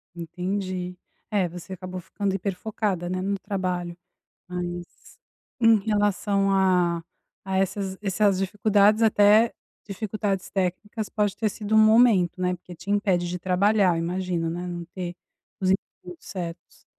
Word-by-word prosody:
Entendi. 180 +1 -4 0.3
É, 200 -4 +1
você 180 +2 -8
acabou 185 0 -6
ficando 195 +2 -3
hiper 195 0 -2
focada, 200 -3 -2
né, 185 0 -2
no 200 +1 -1
trabalho. 180 -3 -3 0.5
Mas, 175 -1 -7 0.4
em 225 -1 +6
relação 205 -1 +1
a 180 -3 +2 0.4
a 190 0 -2
essas 195 0 -1
essas 195 0 +2
dificuldades, 205 +2 +3
até 215 +1 +5 0.3
dificuldades 200 -1 -3
técnicas, 200 +3 -2
pode 205 -2 0
ter 220 -2 +1
sido 210 +1 -3
um - - +7
momento, 215 -5 +5
né, 180 0 +1
porque 180 0 -11
te 195 - -8
impede 195 -4 +2
de 180 +1 -3
trabalhar, 190 +1 +3
eu - - -1
imagino, 175 -2 -1
né, 175 +2 -4
não 175 -1 -5
ter 175 -2 -5 0.4
os 185 -1 +2
utensílios 180 -2 -3
certos. 175 -3 -8
190 Hz, 140 wpm, -25 LUFS, 180-205 Hz, 0.5 s, um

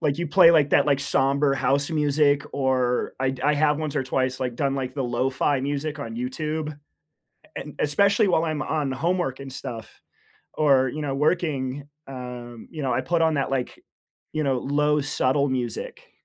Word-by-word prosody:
like, 145 -2 0
you 170 - -1
play, 155 +2 +7
like, 150 -4 +4
that, 145 - +4
like, 140 -2 +2
somber 140 +1 +2
house 140 +3 +1
music 145 -2 +2
or 130 -2 0
I'd 130 -1 -1
I 150 +2 +2
have 150 0 +2
once 155 -2 -3
or 140 - +1
twice, 130 0 -1
like, 125 -2 -2
done, 135 0 0
like, 130 -2 -4
the 135 -2 -2
lo-fi 130 +3 0
music 145 +2 -3
on 115 -5 -6
YouTube. 150 +5 -3 0.8
And - - -8
especially 200 +8 +3
while 165 -2 +2
I'm 155 -2 -2
on 150 -3 -1
homework 170 -2 -1
and 135 -1 -8
stuff 115 -3 -8 0.5
or, 135 -4 +3
you 150 +5 -5
know, 140 -2 -2
working, 145 -3 -1 0.2
um, 125 -3 -8
you 155 - -7
know, 130 - 0
I 120 - +1
put 165 +6 0
on 160 -1 +3
that, 140 - -1
like, 135 -2 -3 0.5
you 155 - -1
know, 135 -3 +1
low 150 +3 +1
subtle 140 0 +1
music. 125 -3 -4
140 Hz, 180 wpm, -24 LUFS, 130-150 Hz, 0.8 s, play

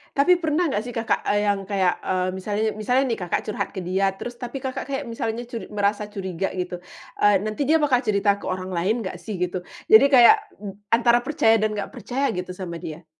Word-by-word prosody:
Tapi 345 +6 +4
pernah 320 +1 +1
nggak 205 - 0
sih, 245 +2 -7
Kakak, 230 0 -1
eee, 205 0 +2
yang 200 -2 0
kayak, 190 -3 +1
eee, 185 0 -1
misal 190 +2 -4 0.2
misalnya 250 +5 +2
nih 230 - -2
Kakak 180 -2 -2
curhat 205 -2 -3
ke 190 - -4
dia 190 +2 0
terus, 240 +4 -8
tapi 250 +2 -6
Kakak 260 0 -4
kayak 275 +1 -3
misalnya 230 0 -3
cur 235 -1 -7
merasa 205 0 -1
curiga 190 -2 -4
gitu. 180 -1 -4 0.4
Eee, 205 0 +5
nanti 215 +6 -2
dia 315 - +4
bakal 265 -4 +3
cerita 200 -3 +1
ke - - -8
orang 185 0 -4
lain 195 +7 0
nggak 185 -2 -6
sih 210 +3 -6
gitu? 180 0 -2 0.3
Jadi 220 +5 +9
kayak 245 -4 +8 0.2
mb 200 -1 -9 0.2
antara 240 0 +4
percaya 235 -4 +2
dan 215 0 0
nggak 200 -1 -4
percaya 270 +3 -2
gitu 180 0 -5
sama 170 -3 -6
dia. 160 +2 -8
210 Hz, 215 wpm, -23 LUFS, 190-240 Hz, 0.4 s, Jadi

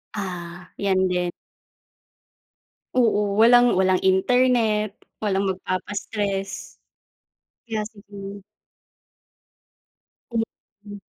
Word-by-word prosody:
Ah, 180 -3 -6
'yan 190 -2 +2
din. 180 -1 0 1.6
Oo, 210 -5 +2
walang 240 +2 +6
walang 185 0 +3
internet, 215 0 +3 0.2
walang 200 -2 0
magpapa-stress. 195 +1 -3 0.9
Kaya 220 -2 -2
sigu 200 -1 -10 1.9
Mm. 210 -2 -6
200 Hz, 65 wpm, -24 LUFS, 190-220 Hz, 1.9 s, walang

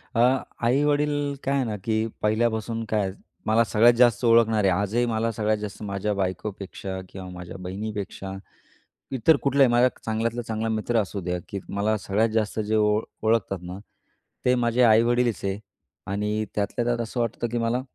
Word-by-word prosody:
अ, - - +1 0.5
आई-वडील, 145 +2 +1
काय 135 - 0
आहे 135 - +2
ना 110 -2 -3
की 110 0 0 0.2
पहिल्यापासून 110 +1 0
काय, 105 -3 0 0.3
मला 110 +2 +4
सगळ्यात 115 +3 +5
जास्त 120 -1 +4
ओळखणारे 115 -3 +4
आजही 105 +6 +1
मला 115 0 0
सगळ्यात 110 0 0
जास्त 105 0 -7
माझ्या 100 +1 -2
बायकोपेक्षा 95 0 -4
किंवा 95 -1 -8
माझ्या 90 0 -8
बहिणीपेक्षा, 100 +1 -5 0.8
इतर 130 +6 +5
कुठलाही 140 -2 +4
माझा 120 +1 +5 0.2
चांगल्यातला 115 +2 -1
चांगला 110 0 -2
मित्र 110 +1 +1
असू 100 0 -5
द्या, 90 0 -2
की 100 - -4
मला 105 +2 0
सगळ्यात 105 +3 +1
जास्त 110 0 -1
जे 110 0 0
ओ 105 0 +3 0.2
ओळखतात 110 -3 +1
ना, 90 +1 -7 0.7
ते 125 0 +4
माझे 120 0 +1
आई-वडीलच 120 +1 +3
आहे. 100 +1 -2 0.5
आणि 105 +2 -1
त्यातल्या 105 +3 -1
त्यात 120 0 0
असं 115 +2 -4
वाटतं 115 0 -1
की 120 - -1
मला 115 +2 0
110 Hz, 160 wpm, -25 LUFS, 100-120 Hz, 0.8 s, सगळ्यात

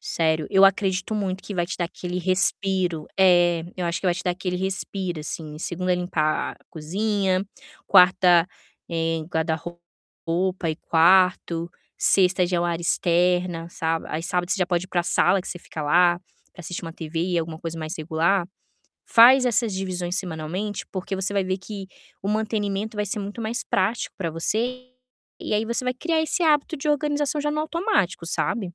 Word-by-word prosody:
Sério, 160 -2 0
eu 195 0 +6
acredito 195 0 +2
muito 190 -2 -2
que 205 - -7
vai 175 -1 0
te 195 - -5
dar 175 - -1
aquele 180 +1 -5
respiro. 185 -2 0
É, 175 -3 +4
eu 180 - -2
acho 170 +1 -2
que 190 - -3
vai 175 - +3
te 175 - -5
dar 180 - +2
aquele 180 0 -3
respiro, 190 -2 -3
assim, 150 0 -6
segunda 180 +2 -2
limpar 165 -4 -1
cozinha, 190 +3 -1 0.4
quarta, 180 -2 +6 0.4
eh, 165 -1 -1
guarda-roupa 170 +1 -3
e 155 - -4
quarto, 175 0 +3 0.3
sexta 185 -1 +3
já 175 0 0
é - - 0
o - - 0
área 170 -1 -1
externa, 175 -1 +1
sabe. 165 -1 -2
Aí 155 - -3
sábado, 180 +1 -1
você - - +2
já 180 - +1
pode 175 0 0
ir - - -13
pra 175 -2 0
sala 180 +2 +3
que - - -7
você 175 - -5
fica 155 -2 -7
lá, 175 +3 +4 0.3
para 175 - -12
assistir 175 +1 -6
uma 165 - -6
TV 160 0 -5
e 170 - +2
alguma 160 -1 -4
coisa 165 0 -5
mais 155 0 -4
regular. 170 +4 +1 0.6
Faz 250 +3 +7
essas 230 -2 +1
divisões 180 -2 -3
semanalmente, 180 +3 -4
porque 190 0 -4
você 190 +1 -1
vai 200 - +1
ver 185 +1 -2
que 195 -1 -8 0.3
o 195 - -3
mantenimento 210 -1 -1
vai 210 - 0
ser 210 +2 -2
muito 205 +3 -6
mais 225 +2 -3
prático 200 +5 -1
para 170 -4 -3
você 225 +10 -1 0.6
e - - -4
aí 215 - +1
você 235 +3 -2
vai 250 - +1
criar 325 +4 0
esse 320 +3 -1
hábito 305 0 +2
de 290 +2 -4
organização 295 0 0
já 295 - -1
no 300 - -2
automático, 325 - 0
sabe. 205 +5 0
180 Hz, 180 wpm, -24 LUFS, 170-200 Hz, 0.6 s, Faz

